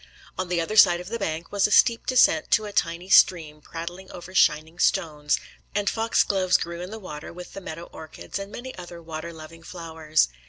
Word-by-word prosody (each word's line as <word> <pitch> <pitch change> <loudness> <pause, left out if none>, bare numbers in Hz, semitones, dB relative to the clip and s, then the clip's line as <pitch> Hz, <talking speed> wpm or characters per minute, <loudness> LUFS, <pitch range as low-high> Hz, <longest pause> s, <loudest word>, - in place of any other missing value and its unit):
On 185 -1 -4
the 175 -1 0
other 190 +6 -2
side 175 -4 +7
of 180 +2 -8
the 230 +1 -4
bank 165 -3 -4
was 200 0 +2
a - - -7
steep 230 +1 +4
descent 245 -11 +4
to 215 - +3
a 205 - -7
tiny 170 +1 -1
stream 160 -6 +4
prattling 175 +4 -8
over 180 +1 -10
shining 160 -2 +2
stones; 150 -2 +1 0.4
and 205 0 0
fox 225 0 +2
gloves 185 -2 +2
grew 170 0 -5
in 180 - -6
the 220 - -7
water 150 -8 -8
with 180 +1 -10
the 195 - -8
meadow 170 -2 -7
orchis, 160 +3 -8
and 195 +1 -7
many 260 +3 -8
other 175 -1 -9
water 165 0 -7
loving 160 0 -12
flowers. 160 - -1
175 Hz, 205 wpm, -25 LUFS, 160-195 Hz, 0.4 s, side